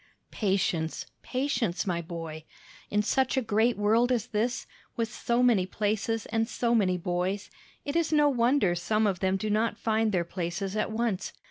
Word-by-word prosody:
"Patience, 190 -6 0 0.2
patience, 255 -8 -1
my 175 -3 -1
boy. 165 -2 -7 0.5
In 210 0 +1
such 265 +4 +1
a - - +4
great 225 +2 +2
world 225 +4 +3
as 235 -4 +1
this 240 +2 -1
is, - - -17 0.3
with 225 -2 -2
so 240 +1 +1
many 215 -7 +4
places 215 +3 -1
and 225 +1 -1
so 235 -1 0
many 190 -5 +3
boys, 180 +3 -2 0.3
it 285 - -3
is 335 -2 +1
no 300 -1 +5
wonder 245 -6 +3
some 215 +5 +1
of 195 -4 0
them 190 0 +1
do 210 +2 -2
not 220 +2 +1
find 220 -1 +1
their 175 -3 +1
places 180 +3 -3
at 215 - 0
once. 220 -4 -2
215 Hz, 175 wpm, -28 LUFS, 185-235 Hz, 0.5 s, no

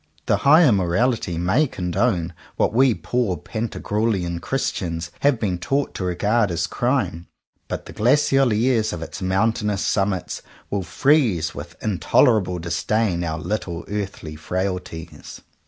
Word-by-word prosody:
The - - +2
Higher 155 0 +6
Morality 95 0 +1
may 95 - +2
condone 90 -3 -1 0.2
what - - +1
we 130 -1 +4
poor 120 -8 -1
Pantag 110 +8 -5
ruelian 95 -6 0
Christians 85 -11 -2
have 140 -4 +2
been 95 -5 -1
taught 135 +10 -1
to - - -4
regard 105 +5 +1
as 85 0 -1
crime; 120 - -1 0.4
but - - -5
the - - -10
glacial 135 +2 +3
airs 110 -1 +2
of 85 -2 -5
its 80 +2 -8
mountainous 105 +2 0
summits 95 -2 -1 0.3
will 100 - 0
freeze 95 - +2
with - - -8
in 105 -5 -1
tolerable 95 -7 +3
disdain 90 +2 0
our 80 -2 -2
little 90 -1 -4
earthy 100 -6 -5
frailties. 90 0 -5
100 Hz, 140 wpm, -22 LUFS, 85-120 Hz, 0.4 s, Higher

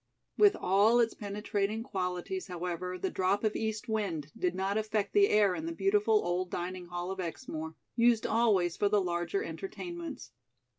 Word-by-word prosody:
With 410 -1 +6
all 205 +6 +4
its 230 -1 +3
penetrating 210 +1 -2
qualities, 190 - -3
however, 180 +1 -4
the 190 - -2
drop 190 +3 +1
of 215 -1 +1
East 220 +2 -2
wind 185 -10 -2
did 180 0 -1
not 190 +2 -1
affect 215 -1 -1
the 405 0 +5
air 205 -3 +4
in 315 - -4
the - - -2
beautiful 420 +4 +2
old 180 +1 -1
dining 180 0 -4
hall 175 +1 -4
of 190 - -6
Exmoor, 160 -3 -5 0.2
used 235 -1 +4
always 205 -7 +2
for 205 - +1
the 210 0 +4
larger 175 - -1
entertainments. 345 - -6
205 Hz, 165 wpm, -31 LUFS, 180-235 Hz, 0.2 s, With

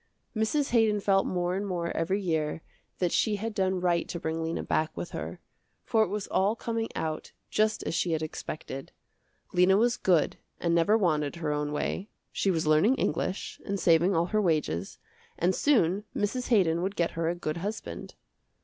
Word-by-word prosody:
Mrs. 245 +7 +1
Haydon 220 -3 +3
felt 195 -1 +2
more 180 0 0
and 195 - -1
more 170 -3 -2
every 180 +5 0
year 160 -4 -1 0.3
that 180 -2 0
she 215 -2 +2
had 220 +2 -4
done 190 -2 +1
right 175 -1 +1
to 170 - -4
bring 160 0 -2
Lena 165 +1 -2
back 155 0 -1
with 175 - -5
her, - - -5 0.5
for 225 - +3
it 220 - +3
was 210 -1 -3
all 200 +4 +1
coming 230 -1 -2
out 155 -1 -3 0.2
just 215 0 +1
as - - -3
she 170 0 +1
had 160 0 -1
expected. 150 -3 -6 0.6
Lena 180 +2 +5
was 240 +3 +3
good 175 -5 +2 0.2
and 170 -1 +1
never 170 +6 +4
wanted 155 -7 +1
her 160 -3 -2
own 150 0 -2
way, 185 +7 -2 0.2
she 195 - 0
was 165 -4 +1
learning 155 +12 +4
English, 195 - -2
and 200 -1 -2
saving 170 +2 +4
all 165 +1 +3
her 215 +4 +1
wages, 150 - 0 0.4
and 180 +2 +2
soon 205 - +2
Mrs. 245 +5 -1
Haydon 175 -8 +3
would 195 +2 -2
get 170 -1 +1
her 165 0 -1
a 175 - -1
good 155 -2 -3
husband. 180 - -5
180 Hz, 185 wpm, -28 LUFS, 165-210 Hz, 0.6 s, Lena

